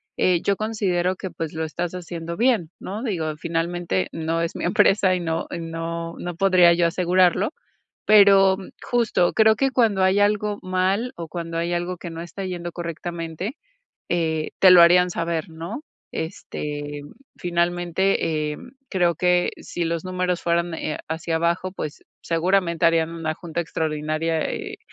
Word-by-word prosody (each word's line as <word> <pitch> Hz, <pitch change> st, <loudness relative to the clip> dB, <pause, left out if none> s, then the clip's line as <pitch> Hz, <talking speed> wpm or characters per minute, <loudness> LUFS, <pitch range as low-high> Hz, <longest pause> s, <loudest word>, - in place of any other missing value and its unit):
eh, 180 Hz, -2 st, +2 dB
yo 200 Hz, -, +2 dB
considero 185 Hz, -4 st, -1 dB
que, 190 Hz, -, -5 dB
pues, 165 Hz, -3 st, -5 dB
lo 160 Hz, 0 st, -2 dB
estás 170 Hz, +2 st, -3 dB
haciendo 170 Hz, -1 st, -6 dB
bien, 230 Hz, -10 st, +2 dB
¿no? 210 Hz, +6 st, -6 dB
Digo, 160 Hz, -9 st, -2 dB
finalmente, 165 Hz, -, -1 dB
no 165 Hz, +1 st, -1 dB
es 170 Hz, -, -2 dB
mi -, -, -5 dB
empresa, 190 Hz, +1 st, +4 dB
y 180 Hz, -, 0 dB
no 165 Hz, -1 st, -2 dB
y 170 Hz, -, -4 dB
no 165 Hz, 0 st, -5 dB
no 175 Hz, -1 st, -5 dB
podría 185 Hz, -2 st, +5 dB
yo 170 Hz, 0 st, +3 dB
asegurarlo, 180 Hz, -, +2 dB, 0.5 s
pero 195 Hz, -2 st, +7 dB, 0.3 s
justo, 230 Hz, -7 st, +1 dB
creo 220 Hz, -1 st, +5 dB
que 270 Hz, +2 st, +1 dB
cuando 220 Hz, -7 st, +2 dB
hay 190 Hz, +2 st, +3 dB
algo 205 Hz, 0 st, +1 dB
mal 190 Hz, +6 st, 0 dB
o 170 Hz, -, -6 dB
cuando 165 Hz, 0 st, -5 dB
hay 170 Hz, +1 st, -1 dB
algo 175 Hz, +1 st, -2 dB
que 170 Hz, -, -7 dB
no 165 Hz, -, -6 dB
está 175 Hz, +3 st, -6 dB
yendo 175 Hz, -2 st, -5 dB
correctamente, 170 Hz, -, -5 dB, 0.6 s
eh, 160 Hz, -2 st, 0 dB
te 190 Hz, -, +7 dB
lo 175 Hz, -, +9 dB
harían 180 Hz, +1 st, +6 dB
saber, 165 Hz, -2 st, -2 dB
¿no?, 165 Hz, -, -6 dB, 0.3 s
este, 145 Hz, -2 st, -5 dB, 0.3 s
finalmente, 175 Hz, -2 st, 0 dB
em, 245 Hz, +10 st, -10 dB, 0.2 s
creo 175 Hz, -3 st, +2 dB
que 180 Hz, 0 st, +2 dB
si 175 Hz, -, -4 dB
los 165 Hz, +1 st, -2 dB
números 180 Hz, -1 st, -1 dB
fueran, 170 Hz, 0 st, 0 dB
eh, 155 Hz, -1 st, -3 dB
hacia 160 Hz, +1 st, -2 dB
abajo, 170 Hz, +3 st, 0 dB
pues, 155 Hz, -5 st, -6 dB, 0.2 s
seguramente 170 Hz, 0 st, +1 dB
harían 165 Hz, 0 st, +2 dB
una 160 Hz, -2 st, -3 dB
junta 170 Hz, 0 st, -4 dB
extraordinaria, 155 Hz, 0 st, -1 dB
eh, -, -, -5 dB
175 Hz, 160 wpm, -23 LUFS, 165-185 Hz, 0.6 s, lo